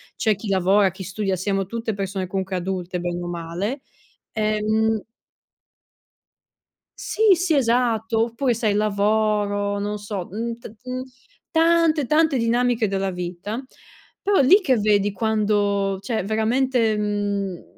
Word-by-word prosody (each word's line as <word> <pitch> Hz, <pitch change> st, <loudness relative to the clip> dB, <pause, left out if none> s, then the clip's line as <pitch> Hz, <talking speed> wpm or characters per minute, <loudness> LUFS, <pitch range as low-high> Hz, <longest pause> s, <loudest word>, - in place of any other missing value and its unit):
c'è 215 Hz, -1 st, +1 dB
chi 200 Hz, +3 st, -8 dB
lavora, 195 Hz, +1 st, +3 dB
chi 190 Hz, +1 st, -9 dB
studia, 195 Hz, +1 st, -2 dB
siamo 195 Hz, +1 st, -1 dB
tutte 225 Hz, +1 st, -3 dB
persone 195 Hz, -1 st, -3 dB
comunque 190 Hz, +1 st, -3 dB
adulte, 180 Hz, 0 st, -3 dB
bene 175 Hz, 0 st, -3 dB
o 175 Hz, -, -5 dB
male, 175 Hz, -, -4 dB, 0.5 s
ehm 215 Hz, 0 st, 0 dB, 2.0 s
Sì, 430 Hz, -2 st, +3 dB
sì, 345 Hz, -2 st, +1 dB
esatto, 230 Hz, -3 st, +2 dB
oppure 240 Hz, +2 st, 0 dB
sai 220 Hz, -2 st, 0 dB
lavoro, 205 Hz, -1 st, +1 dB
non 205 Hz, +1 st, -2 dB
so, 205 Hz, -3 st, -5 dB
uhm, 230 Hz, +3 st, -4 dB
t 235 Hz, -, -10 dB
uhm, 255 Hz, 0 st, -4 dB, 0.5 s
tante, 330 Hz, -2 st, +3 dB
tante 305 Hz, +1 st, +3 dB
dinamiche 235 Hz, -1 st, +1 dB
della 195 Hz, 0 st, -1 dB
vita. 180 Hz, +7 st, -5 dB, 0.6 s
Però 405 Hz, 0 st, +2 dB
è -, -, +5 dB
lì 380 Hz, +11 st, +6 dB
che 265 Hz, -9 st, +2 dB
vedi 205 Hz, -1 st, +2 dB
quando 205 Hz, -2 st, 0 dB
cioè 220 Hz, +1 st, -2 dB
veramente, 225 Hz, +2 st, +1 dB
mhmm, 205 Hz, -3 st, -2 dB
210 Hz, 130 wpm, -22 LUFS, 195-235 Hz, 2.0 s, lì